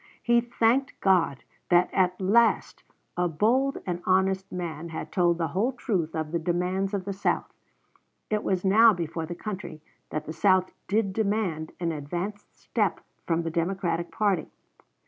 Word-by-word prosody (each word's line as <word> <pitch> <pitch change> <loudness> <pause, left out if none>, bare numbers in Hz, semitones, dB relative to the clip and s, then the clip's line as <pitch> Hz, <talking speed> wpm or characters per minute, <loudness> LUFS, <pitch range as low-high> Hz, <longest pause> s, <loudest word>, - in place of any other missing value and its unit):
He 235 0 +4
thanked 240 +3 +1
God 180 -8 +2 0.3
that 175 0 +4
at 185 -1 +2
last 225 +5 +2 0.3
a 175 0 +1
bold 240 - +1
and 175 -1 -3
honest 190 +1 +1
man 170 -2 -5
had 160 - -6
told 175 -2 +2
the 165 -2 -1
whole 210 - 0
truth 180 -10 -2
of 155 -1 -3
the 170 - 0
demands 180 +4 -1
of 190 -2 -3
the 200 - -3
South. 195 - -1 0.8
It 210 0 0
was 190 -1 0
now 220 +4 +7
before 165 -2 -4
the 175 - -5
country 190 -5 -6 0.3
that 155 0 -4
the 155 - -5
South 185 +2 +3 0.2
did 200 -1 +1
demand 200 -7 -1
an 170 -1 -1
advanced 175 +7 -5
step - - -1 0.3
from 170 0 +1
the 165 - -3
Democratic 170 0 -1
party. 200 -7 0
185 Hz, 160 wpm, -27 LUFS, 170-205 Hz, 0.8 s, now